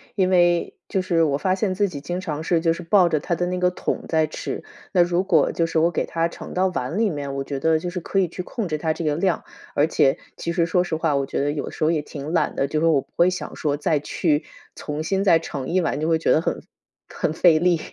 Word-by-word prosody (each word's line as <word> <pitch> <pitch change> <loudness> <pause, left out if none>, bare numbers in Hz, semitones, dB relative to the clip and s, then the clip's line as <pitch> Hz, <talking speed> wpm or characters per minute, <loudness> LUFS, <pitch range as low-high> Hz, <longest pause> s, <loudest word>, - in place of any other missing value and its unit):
因 185 -3 +2
为 175 -2 +3
就 190 - 0
是 170 -3 +2
我 140 -3 +1
发 185 +4 +1
现 190 -1 0
自 200 +1 +1
己 145 -5 -7
经 175 +4 -3
常 155 -4 -4
是 165 0 +2
就 165 -1 +2
是 175 - -7
抱 180 0 +4
着 155 - +1
它 170 - -2
的 175 - -1
那 180 - -2
个 180 0 +2
桶 - - -3
在 160 -1 +2
吃， 155 - -5 0.3
那 180 - +4
如 175 +1 +1
果 160 -6 +3
就 165 - 0
是 165 -1 0
我 165 +2 +4
给 - - -1
它 165 0 0
盛 170 - -9
到 185 +1 +2
碗 165 -1 -3
里 220 -2 +2
面， 140 -3 -4
我 135 - -2
觉 135 0 -4
得 160 +2 +2
就 175 - -4
是 180 +1 -4
可 195 - -1
以 185 - +2
去 180 +2 -6
控 220 +1 -4
制 155 -2 -2
它 160 +1 0
这 160 - -5
个 150 -2 +1
量， 175 +2 0 0.3
而 145 +2 +3
且， 135 -4 +2 0.2
其 170 - -3
实 170 -1 +2
说 180 +2 +2
实 165 - -3
话， 160 -2 0
我 140 0 +1
觉 - - -3
得 145 - +1
有 145 -1 -4
时 - - -4
候 155 - +4
也 160 -3 0
挺 145 0 -7
懒 165 - +1
的， 135 - 0
就 155 +2 -1
说 165 +1 +3
我 140 -3 +3
不 - - -22
会 175 +1 +4
想 180 - -5
说 145 -2 -1
再 150 0 +1
去 150 0 0 0.3
重 150 0 -5
新 195 +3 0
再 170 -5 +5
盛 140 -5 -5
一 185 +2 +2
碗， 150 -4 -1
就 155 - -1
会 165 -1 +2
觉 - - +1
得 155 - +4
很 - - -2 0.5
很 155 - -2
费 165 -1 +5
力。 175 -1 +3
165 Hz, 300 characters per minute, -23 LUFS, 150-180 Hz, 0.5 s, 再